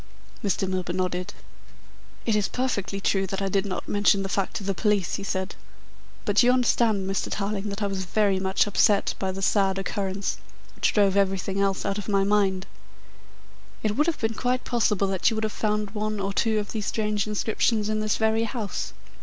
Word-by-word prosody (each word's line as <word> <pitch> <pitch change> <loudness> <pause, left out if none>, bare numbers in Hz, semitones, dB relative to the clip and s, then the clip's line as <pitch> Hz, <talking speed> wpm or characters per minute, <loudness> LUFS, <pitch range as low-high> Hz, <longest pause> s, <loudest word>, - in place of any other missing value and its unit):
Mr. 195 -1 0
Milburgh 185 -2 -2
nodded. 180 -1 -2 0.9
"It 225 - +2
is 210 -1 +2
perfectly 205 -6 -2
true 195 0 +1
that 195 +1 -3
I 195 -1 -1
did 195 +1 +1
not 185 - -4
mention 205 -1 +3
the 195 - -4
fact 195 -1 -1
to - - -3
the 195 0 0
police," 200 -1 +1
he 200 - -6
said, 190 0 -2 0.7
"but 205 -1 +4
you 245 0 +5
understand 230 -5 +2
Mr. 195 0 -1
Tarling 205 0 -2
that 200 +1 -4
I - - +2
was 195 -1 -2
very 200 0 +2
much 190 0 +2
upset 205 0 +3
by 190 -1 -1
the 195 +1 -5
sad 195 -1 +2
occurrence, 195 0 -2 0.4
which - - +1
drove 200 -2 +3
everything 195 0 +1
else 195 -1 0
out 200 0 -1
of 205 - -6
my 195 -1 +3
mind. 195 -2 +2 1.2
It 210 -1 0
would 300 +5 +2
have 335 - +1
been 225 0 0
quite 250 +2 -1
possible 210 -5 +1
that 190 +2 +2
you 225 - -2
would 220 - -2
have 215 - -1
found 210 -1 -1
one 215 0 -2
or 195 0 -2
two 220 +1 +2
of 210 -1 -2
these 215 -2 -3
strange 210 -2 0
inscriptions 215 0 +1
in 215 0 0
this 215 -1 0
very 220 +1 +2
house." 225 -3 -4
200 Hz, 200 wpm, -26 LUFS, 195-215 Hz, 1.2 s, you